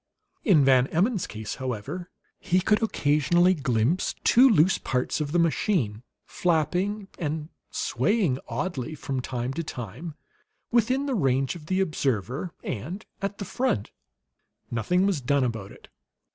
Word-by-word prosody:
In 160 - +5
Van 130 -1 +5
Emmon's 195 - +1
case, 110 -1 -6
however, 130 - -4 0.3
he 180 +1 +2
could 210 +4 +2
occasionally 175 -2 +3
glimpse 135 +1 0
two 260 +3 +6
loose 185 -4 +4
parts 125 +4 -1
of 145 -1 -2
the 175 - +2
machine, 165 - +1 0.2
flapping 180 +5 0
and 155 -1 -3 0.2
swaying 155 - +1
oddly 155 -4 -3
from 135 -3 -3
time 125 0 -3
to 165 - -3
time 130 - -7 0.6
within 250 +4 +2
the 275 - -1
range 135 - +1
of 155 -3 -11
the 185 +2 +1
observer, 135 - -1
and 160 - -5 0.2
at 200 +1 -3
the 200 - -5
front. 185 - -1 0.8
Nothing 150 - +1
was 190 -8 +1
done 140 +2 +2
about 110 -5 -3
it. - - -15
155 Hz, 140 wpm, -26 LUFS, 130-185 Hz, 0.8 s, two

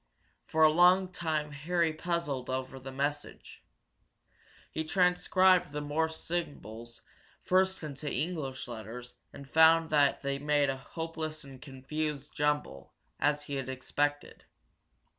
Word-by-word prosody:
For 160 0 +2
a 155 - +7
long 180 +3 +5
time 155 -4 -2
Harry 165 +3 0
puzzled 160 -6 -2
over 130 0 -3
the 135 +1 -8
message. 145 +2 -4 1.1
He 160 - -2
transcribed 180 0 +3
the 150 - -3
Morse 160 +2 -1
symbols 120 - -6 0.4
first 190 -1 +2
into 145 -1 -5
English 150 -6 -3
letters 120 +1 -8 0.2
and 140 - -11
found 160 +2 +5
they 140 -2 +2
made 145 -1 +2
a 135 - -5
hopeless 160 +1 -5
and 135 -2 -12
confused 145 +1 -4
jumble, 150 - -1 0.2
as 145 +1 +1
he 140 -1 -4
had 130 -1 -4
expected. 145 +3 -2
150 Hz, 120 wpm, -30 LUFS, 135-160 Hz, 1.1 s, a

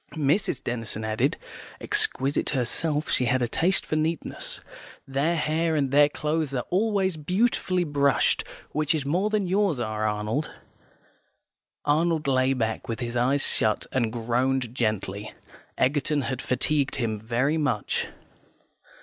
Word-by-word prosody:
Mrs. 150 -1 +1
Denison 115 -2 -2
added, 110 0 0 0.4
(exquisite 135 +2 +1
herself, 150 +4 0
she 125 - +3
had 125 +1 +2
a - - +1
taste 175 +9 +1
for - - -2
neatness): 160 +1 -2 0.5
"Their 140 +5 +1
hair 160 +1 0
and 140 -3 +1
their 145 +1 +6
clothes 150 -1 -2
are 125 - -2
always 190 -2 +1
beautifully 185 +2 +1
brushed; 140 -3 +2 0.3
which 155 +1 +1
is 145 -3 -2
more 180 +9 +1
than 215 -2 0
yours 185 -5 +1
are, 110 -2 -1
Arnold." 105 +8 -1 1.4
Arnold 155 +1 +2
lay 130 0 +3
back 115 0 -2
with 115 0 -3
his 120 -1 -4
eyes 130 +4 +2
shut, 110 -1 +1
and 120 -4 0
groaned 120 +2 0
gently. 110 -3 -2 0.4
Egerton 145 +2 +1
had 130 -1 -3
fatigued 140 +2 0
him 115 -5 -2
very 120 +8 0
much. 130 -9 0
140 Hz, 135 wpm, -26 LUFS, 120-155 Hz, 1.4 s, their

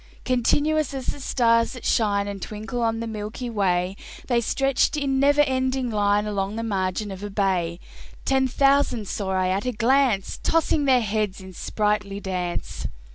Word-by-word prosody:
Continuous 290 +4 +1
as 260 -2 -5
the - - -3
stars 230 -3 +2
that 250 - -9
shine 205 -3 +2
And 200 -1 -6
twinkle 220 +3 -4
in 225 0 -3
the - - -3
milky 220 +2 -5
way, 185 -3 0 0.3
They 240 -2 +2
stretched 270 +5 +1
in 275 -2 0
never 285 +2 +5
ending 260 -2 0
line 205 0 +2
Along 200 -1 -2
the 230 - -3
margin 195 -1 -2
of 190 0 -7
a 205 - -5
bay: 185 -4 0 0.5
Ten 265 -1 +2
thousand 275 -4 +2
saw 195 0 -3
I 185 -1 +1
at 195 +5 -1
a - - +1
glance, 235 -3 +1
Tossing 320 -2 +2
their 260 -2 +4
heads 210 -2 -1
in 190 -1 -11
sprightly 205 +1 -1
dance. 180 -3 -4
220 Hz, 170 wpm, -24 LUFS, 200-260 Hz, 0.5 s, never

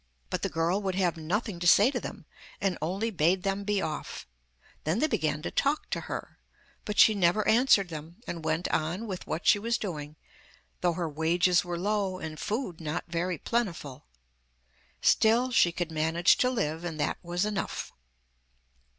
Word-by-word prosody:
But - - -1
the - - -1
girl 165 +5 0
would 190 -2 -2
have 180 -3 +1
nothing 180 +4 -2
to 175 - 0
say 205 +8 +6
to - - -2
them, - - -8 0.3
and 195 -2 0
only 195 +8 -1
bade 180 0 +2
them 195 0 -1
be 205 -1 0
off; 155 - -5 0.6
then 160 +5 0
they 300 - +2
began 155 - -1
to - - -3
talk 285 +2 0
to - - 0
her, - - -6 0.5
but 210 -1 -4
she 220 - +7
never 195 +1 +2
answered 220 -5 +4
them, 160 +2 -8
and 165 -2 -5
went 160 +2 0
on 170 +8 -1
with 190 -4 -6
what 160 - -3
she 205 - +5
was 230 +3 0
doing, 150 -6 -5 0.6
though 175 -1 +1
her 170 0 -2
wages 170 +4 +2
were 175 -1 -4
low 195 0 -1
and 155 -3 -7
food 205 -7 -3
not 155 0 -3
very 170 +1 -1
plentiful. 165 - -3 1.0
Still 235 +4 +4
she 175 -7 +4
could 170 -1 -3
manage 160 +2 +3
to 250 - +3
live, 165 -10 -2
and 165 -3 -5
that 145 - -1
was 175 +2 -1
enough. 210 -3 -3
175 Hz, 175 wpm, -28 LUFS, 160-205 Hz, 1.0 s, she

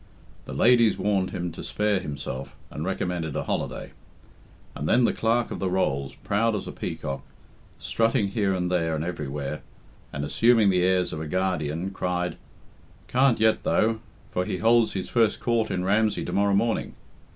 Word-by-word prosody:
The - - -7
ladies 120 -3 +4
warned 100 -3 +1
him 90 0 -4
to - - -8
spare 105 -2 0
himself, 70 -4 -6 0.2
and 75 - -5
recommended 90 -4 -2
a - - -1
holiday; - - -3 0.8
and 75 - -4
then 125 - +4
the - - +2
Clerk 115 +1 +1
of - - -4
the 95 - 0
Rolls, 70 -7 -1
proud 110 +2 +1
as 105 - -4
a - - -6
peacock, 70 0 -5 0.6
strutting 115 -2 +1
here 100 -1 0
and 90 -1 -1
there 80 -3 +1
and 75 - -2
everywhere, 75 -4 -4 0.5
and 70 +1 -3
assuming 115 +3 +4
the 90 -1 +2
airs 90 0 +2
of 80 - -4
a 80 - -4
guardian, 90 0 -1
cried, 90 -2 -2 0.7
"Can't 130 -2 +3
yet, 110 0 +3
though, 110 0 +1 0.3
for 90 - 0
he 90 - -3
holds 115 +2 +3
his 95 -2 -3
first 115 -3 +2
court 115 -2 +1
in 90 - -1
Ramsey 105 +2 +1
tomorrow 100 0 +2
morning.... 115 +3 0
95 Hz, 170 wpm, -26 LUFS, 80-110 Hz, 0.8 s, ladies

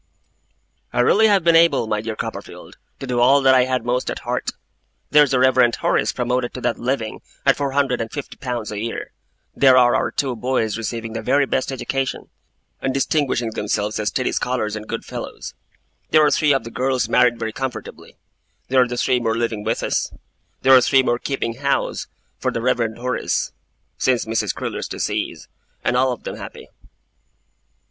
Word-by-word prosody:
'I 120 - +3
really 220 - +5
have 200 -4 +3
been 170 0 +4
able, 165 -7 +5
my 105 -1 -1
dear 110 0 -4
Copperfield, - - -7 0.2
to - - -5
do 125 -2 -1
all 130 +4 +6
that 135 -1 +5
I 130 -1 +5
had 130 -2 -1
most 125 +1 0
at - - -3
heart. - - -1 0.6
There's 150 -1 +6
the 130 - +2
Reverend 125 -2 +4
Horace - - +1
promoted 125 0 -2
to 125 - -6
that 120 -1 -1
living 120 -3 -2 0.2
at - - +5
four 140 -2 -2
hundred 135 -4 +1
and 115 - -4
fifty 145 - -6
pounds 120 -5 -4
a 105 - -4
year; 115 +2 -5 0.4
there 130 -2 +6
are 120 -1 +5
our - - +1
two 130 -3 -2
boys 115 -2 -1
receiving 115 0 -4
the 115 - -3
very 140 +6 +2
best 130 0 -1
education, 135 0 -3 0.5
and 135 0 -1
distinguishing 135 -5 0
themselves 105 0 -2
as 105 - -2
steady 125 - 0
scholars 110 -4 -1
and 105 0 -7
good - - -5
fellows; - - -7 0.6
there 155 -1 +5
are - - +3
three 150 -1 +3
of 135 - +2
the 115 - -8
girls 130 +1 0
married 120 -1 +3
very 110 -1 -4
comfortably; 130 +1 -6 0.5
there 130 0 +4
are 125 - +3
three 125 +1 +1
more 115 -1 -1
living 115 -3 -2
with 115 +2 -1
us; - - -1 0.5
there 135 0 +6
are 130 - +7
three 135 +2 +4
more 120 -1 0
keeping 120 -4 -3
house 140 0 -1 0.3
for - - 0
the - - -3
Reverend 115 -2 0
Horace 125 +1 -1 0.5
since 125 -2 +1
Mrs. 110 0 -1
Crewler's - - -4
decease; - - -3 0.4
and 120 - +1
all 130 +1 +3
of 125 - -6
them - - -6
happy. - - -10
125 Hz, 185 wpm, -21 LUFS, 115-135 Hz, 0.6 s, are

